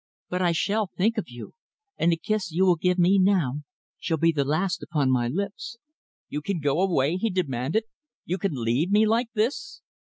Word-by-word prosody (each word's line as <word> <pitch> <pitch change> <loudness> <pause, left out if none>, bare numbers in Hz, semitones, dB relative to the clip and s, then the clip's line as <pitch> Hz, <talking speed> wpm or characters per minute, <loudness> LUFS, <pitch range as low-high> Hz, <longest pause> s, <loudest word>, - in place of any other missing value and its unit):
But 180 +1 -2
I 175 -2 +3
shall 205 +5 0
think 215 +6 0
of 210 - -6
you, 120 -1 -10 0.4
and 170 - +2
the 165 - +1
kiss 210 -1 -2
you 180 +4 +2
will 180 -2 +5
give 180 +2 0
me 185 +2 +4
now 175 -8 +2 0.4
shall 165 - -1
be 165 +2 +3
the 145 -3 0
last 165 +6 -1
upon 145 -6 0
my 120 -2 +1
lips." 200 - -4 0.5
"You 150 - -4
can 185 +3 -2
go 145 +3 +1
away?" 170 -4 +1
he 225 +4 0
demanded. 160 - -1 0.4
"You 185 +3 -2
can 195 -5 -1
leave 125 +7 0
me 210 +2 +4
like 230 +3 +1
this?" 270 - -2
180 Hz, 195 wpm, -25 LUFS, 150-200 Hz, 0.5 s, will